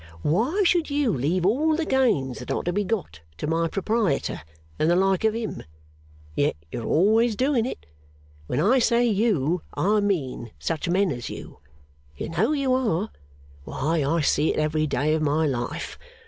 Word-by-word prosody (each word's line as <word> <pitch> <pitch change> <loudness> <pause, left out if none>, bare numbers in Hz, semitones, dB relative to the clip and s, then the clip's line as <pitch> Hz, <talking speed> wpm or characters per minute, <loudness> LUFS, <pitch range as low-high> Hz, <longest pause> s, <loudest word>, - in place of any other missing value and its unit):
Why 245 - +1
should 345 -3 +2
you 285 -6 +1
leave 165 +8 0
all 300 +10 +2
the 325 0 -1
gains 220 - +1
that 125 - -9
are - - -1
to 175 - -1
be 205 +2 +1
got 190 - -3 0.2
to - - -4
my 165 +2 +1
proprietor 200 -3 -1 0.4
and 155 - +2
the 175 - +4
like 190 +1 +2
of 220 0 +2
him? 230 -2 -4 0.7
Yet - - +1 0.2
you're 115 - -4
always 220 +6 +3
doing 255 -1 +1
it. 260 - -7 0.6
When - - -1
I 255 +6 +4
say 235 0 +3
you, 190 - +1
I 210 +3 +2
mean 155 - -1
such 165 +1 -3
men 190 +1 +2
as 120 -3 -5
you. - - -9 0.6
You - - -4
know 175 - +1
you 275 -4 +1
are. 220 -6 0 0.5
Why, 155 - -1
I 160 +4 +1
see 150 +1 +2
it - - -4
every 155 0 +1
day 150 +2 +1
of 160 - 0
my 155 +1 +2
life. 125 -5 -3
190 Hz, 175 wpm, -25 LUFS, 155-230 Hz, 0.7 s, the